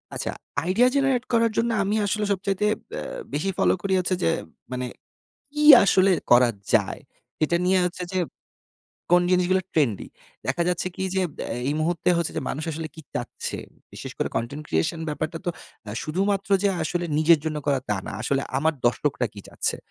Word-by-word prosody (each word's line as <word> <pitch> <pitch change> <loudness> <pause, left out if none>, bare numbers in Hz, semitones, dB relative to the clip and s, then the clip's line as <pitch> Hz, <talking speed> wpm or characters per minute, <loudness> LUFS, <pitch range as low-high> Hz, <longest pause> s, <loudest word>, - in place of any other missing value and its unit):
আচ্ছা, - - -2 0.3
idea 195 +9 +4
generate 270 -3 +2
করার 230 -1 +4
জন্য 230 +1 +2
আমি 200 +2 0
আসলে 210 +1 0
সবচাইতে 195 +1 -1 0.3
আ - - -4 0.3
বেশি 155 +7 0
ফলো - - +4
করি 195 0 -1
হচ্ছে 185 +1 0
যে - - +3 0.4
মানে, 125 0 -2 0.7
কি 300 0 0 0.2
আসলে 195 -1 +4 0.2
করা 120 0 +7 0.2
যায়? - - +2 0.4
এটা 170 +3 +2
নিয়ে 185 +1 +4
হচ্ছে 180 0 -3
যে 185 - +1 0.9
কোন 175 0 +7
জিনিসগুলো 185 +1 +3
ট্রেন্ডি? 130 - +1 0.4
দেখা 135 +6 +1
যাচ্ছে 180 0 -1
কি? - - -3
যে, 190 - +2 0.3
এ - - -3
এই 145 - 0
মুহূর্তে 170 +2 0
হচ্ছে 170 -1 -1
যে - - -1
মানুষ 150 +3 -3
আসলে 160 +1 -5
কী 160 - -10
চাচ্ছে? - - -4 0.3
বিশেষ - - -7
করে - - 0
কনটেন্ট 130 +6 -3
ক্রিয়েশন 80 - 0
ব্যাপারটা 155 +2 -3
তো - - +2 0.3
অ্যা 105 - -7
শুধুমাত্র 195 +5 -1
যে 200 - +4
আসলে 175 +2 -1
নিজের 160 +1 +6
জন্য 155 -1 -2
করা, 140 -2 +3
তা 105 - +2
না। - - -5
আসলে 140 0 0 0.2
আমার 160 +3 +1
দর্শকরা 125 +1 +1
কী 100 - -8
চাচ্ছে? - - -2
175 Hz, 180 wpm, -24 LUFS, 150-195 Hz, 0.9 s, করা